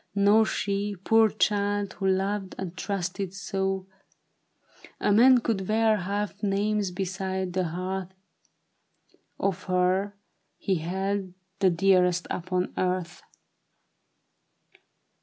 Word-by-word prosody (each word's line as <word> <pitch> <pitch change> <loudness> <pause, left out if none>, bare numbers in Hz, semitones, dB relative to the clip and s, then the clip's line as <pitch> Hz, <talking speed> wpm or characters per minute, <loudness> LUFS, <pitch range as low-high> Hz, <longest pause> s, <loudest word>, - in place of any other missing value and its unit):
Nor 205 +2 +5
she, 200 0 -2
poor 220 +4 +4
child, 205 -1 0
who 195 - -2
loved 195 +1 -1
and 185 -2 -5
trusted 190 -1 -3
so, 195 0 -2 1.1
A - - +1
man 245 +4 +6
could 195 -5 -1
wear 220 0 +3
half 200 +2 -3
names 205 0 0
beside 190 0 -3
the 185 -1 0
hearth 185 +2 -4 1.3
Of 195 -2 -1
her 185 +2 +1 0.4
he 190 -2 0
held 190 +3 -3 0.2
the 195 -2 +4
dearest 180 0 +3
upon 185 +1 -2
earth 180 -1 -2
195 Hz, 100 wpm, -27 LUFS, 185-205 Hz, 1.3 s, man